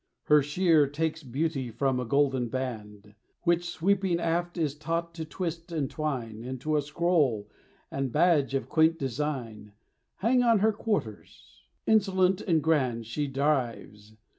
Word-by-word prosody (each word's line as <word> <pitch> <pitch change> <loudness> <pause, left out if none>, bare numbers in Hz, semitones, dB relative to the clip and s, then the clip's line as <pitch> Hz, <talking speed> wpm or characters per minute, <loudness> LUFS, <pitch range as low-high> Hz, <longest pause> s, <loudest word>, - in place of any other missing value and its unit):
Her 150 0 +5
sheer 155 +1 +3
takes 160 +3 -2
beauty 135 0 -2
from 130 +2 0
a 125 - -2
golden 135 0 +1
band, 105 -5 -6 0.3
Which, 175 0 +1
sweeping 185 0 +1
aft, 170 +1 -1
is 155 -4 0
taught 165 +3 -3
to 165 -1 -5
twist 170 +1 -5
and 150 -5 -2
twine 125 -8 -3
Into 130 +5 -3
a 150 - +3
scroll, 145 - +1 0.4
and 135 -2 -2
badge 150 -3 +3
of 135 - -2
quaint 160 +1 +3
design 125 -7 -4 0.4
Hang 245 +5 +2
on 230 -2 +4
her 215 +2 +3
quarters. 205 - -4 0.2
Insolent 190 -3 +3
and 165 -5 +1
grand 130 -8 +1
She 145 +6 -2
drives. 125 -7 -2
150 Hz, 140 wpm, -28 LUFS, 130-170 Hz, 0.4 s, Her